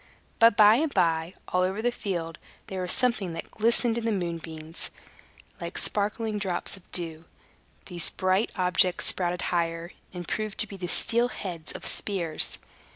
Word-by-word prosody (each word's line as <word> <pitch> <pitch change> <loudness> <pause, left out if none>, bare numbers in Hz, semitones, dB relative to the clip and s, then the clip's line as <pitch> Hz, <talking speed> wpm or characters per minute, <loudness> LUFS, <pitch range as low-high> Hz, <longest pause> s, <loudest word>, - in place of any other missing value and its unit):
But 230 -3 +6
by 215 +1 +7
and 310 +2 0
by, 165 -2 +1
all 180 - +1
over 190 +3 0
the 240 +2 +1
field, 170 -8 -4 0.3
there 190 -1 -5
was 180 0 0
something 215 -8 +1
that 165 - -7
glistened 230 +1 +2
in 230 - -6
the 230 - +1
moonbeams, 165 -4 -4 0.7
like - - -6
sparkling 210 +1 -1
drops 185 -2 +1
of 190 - -16
dew. 165 -2 -2 0.6
These 175 -3 +1
bright 185 +3 +1
objects 180 0 +2
sprouted 180 -1 +1
higher, 165 0 -1 0.2
and 175 -2 -7
proved 215 -2 -3
to 220 - -1
be 200 - -9
the 180 -2 -5
steel 235 +6 +4
heads 175 -9 -4
of - - -8
spears. 175 -6 0
185 Hz, 160 wpm, -27 LUFS, 170-215 Hz, 0.7 s, by